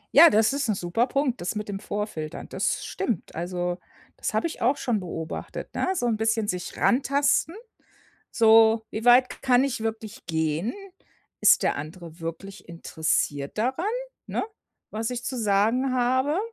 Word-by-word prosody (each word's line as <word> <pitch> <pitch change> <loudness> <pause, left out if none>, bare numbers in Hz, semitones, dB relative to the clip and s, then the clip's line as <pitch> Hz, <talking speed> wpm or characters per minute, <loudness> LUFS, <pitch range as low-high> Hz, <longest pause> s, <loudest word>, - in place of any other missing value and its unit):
Ja, 330 +4 +10
das 220 +5 +3
ist 280 -4 -1
'n 215 - +2
super 185 +7 0
Punkt, 275 -4 -1
das 180 +5 -3
mit 210 0 -4
dem 195 -1 -4
Vorfiltern, 200 -9 -5
das - - -2
stimmt. 220 -9 -3
Also, 175 +1 -3 0.4
das - - -3
habe - - +1
ich 335 - -4
auch 255 +5 +2
schon 230 -5 0
beobachtet, 165 -3 -6
ne? - - -1
So 245 - -1
'n 225 -3 +1
bisschen 220 -1 0
sich 180 -2 -4
rantasten, 280 +6 +2 0.8
so: 225 0 +5
„Wie 225 +3 -5
weit 250 +1 +6
k - - -9
kann 255 0 +4
ich 270 -5 -2
wirklich 225 +2 -5
gehen? 160 - -1 0.7
Ist - - +6
der - - +1
andere 165 +3 -9
wirklich 165 +4 -7
interessiert 160 -3 -2
daran, 260 - -1 0.4
ne, - - -2 0.5
was 220 +1 -3
ich 245 -1 -4
zu 255 - -3
sagen 225 +5 +2
habe?“ 260 +5 +1
220 Hz, 165 wpm, -25 LUFS, 180-250 Hz, 0.8 s, Ja